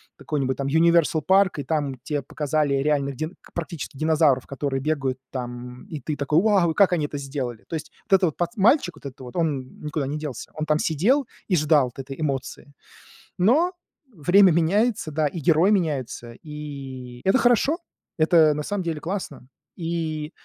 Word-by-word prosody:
какой-нибудь 135 -3 -2
там 140 - -3
"Юниверсал 165 +1 +3
парк", 190 -2 +3
и - - -2
там 140 -3 -2
те 145 -1 -2
показали 150 +1 0
реальных 140 -1 0
дин 155 +5 -5 0.2
практически 165 -3 -5
динозавров, 155 -4 +2
которые 135 -1 -2
бегают 135 -4 -1
там, 125 -1 -6
м, - - -14
и 155 - -6
ты 145 +3 -3
такой: 150 +3 +2
"Вау! 195 -6 +3
И - - -3
как 190 0 +4
они 155 -4 +1
это 145 -1 -5
сделали?" 135 -5 -5
То 165 - -3
есть 155 -1 -6 0.2
вот - - +1
этот 190 - +5
вот 150 - -12
пац 175 +6 -1
мальчик, 215 - +3
вот - - -17
этот 135 -1 -8
вот, 125 -2 -10
он 145 -7 -2
никуда 150 -2 -3
не 145 +2 -3
делся, 150 -6 -6
он 155 0 -2
там 155 0 +2
сидел 220 - +2 0.2
и 185 - +2
ждал 150 -3 +4
вот - - -12
этой 135 +2 -7
эмоции. 140 -1 -4 0.6
Но 280 - +3 0.4
время 185 +3 +5
меняется, 175 +2 +1
да, 155 0 +1
и 165 - -5
герой 165 +6 +4
меняется, 140 - -1
и 135 -5 -8
это 190 +7 +4
хорошо, 250 +6 +3 0.4
это 155 -1 +5
на 150 0 -3
самом 205 +4 -2
деле 160 -3 -3
классно. 185 -7 -5 0.3
И 165 -2 -3
155 Hz, 185 wpm, -24 LUFS, 140-170 Hz, 0.6 s, этот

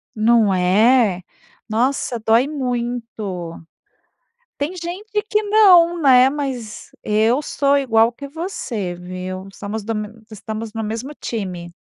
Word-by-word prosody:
Não 220 -2 +3
é, 195 +2 +3 0.5
nossa 240 +1 0
dói 225 +4 +3
muito. 235 - -4 1.0
Tem 290 +5 -2
gente 385 +5 -4
que 425 - +2
não, 365 -5 +5
né. 260 -2 +6
Mas 265 -6 -5
eu 220 +6 +2
sou 280 -1 +1
igual 230 -4 +3
que 280 +4 -9
você, 275 - -4
viu. 185 +1 -7
Somos 210 +1 -5
do 225 +1 -3
me 210 0 -4 0.2
estamos 215 +1 -6
no 225 -1 -3
mesmo 225 +6 -4
time. 180 -6 -5
230 Hz, 120 wpm, -20 LUFS, 210-280 Hz, 1.0 s, né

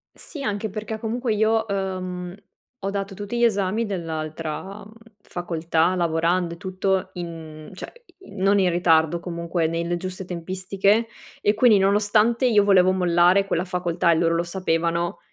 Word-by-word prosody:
Sì 290 -4 -8
anche 210 -2 -2
perché 215 +2 -5
comunque 235 +1 -2
io, 220 +1 +2
uhm, 185 -2 -4 0.5
ho 195 - -1
dato 195 0 -4
tutti 205 +4 -5
gli 240 - +1
esami 210 +1 +1
dell'altra 165 +1 -5 0.4
facoltà 170 -1 -1
lavorando 170 0 0
e - - -17
tutto 190 0 -1
in 160 -3 -8
cioè 185 - -8 0.3
non 200 - +1
in 185 - +3
ritardo, 165 -1 +3
comunque 170 -1 -2
nelle 170 +1 -2
giuste 185 +1 -6
tempistiche 190 +5 0 0.3
e 205 - +3
quindi 220 -1 +5
nonostante 210 +5 +2
io 215 -5 +4
volevo 185 -2 +5
mollare 180 +1 +3
quella 170 - 0
facoltà 180 -1 0
e - - +4
loro 165 0 +2
lo 170 - +1
sapevano, 170 -1 -1
185 Hz, 145 wpm, -23 LUFS, 170-205 Hz, 0.5 s, quindi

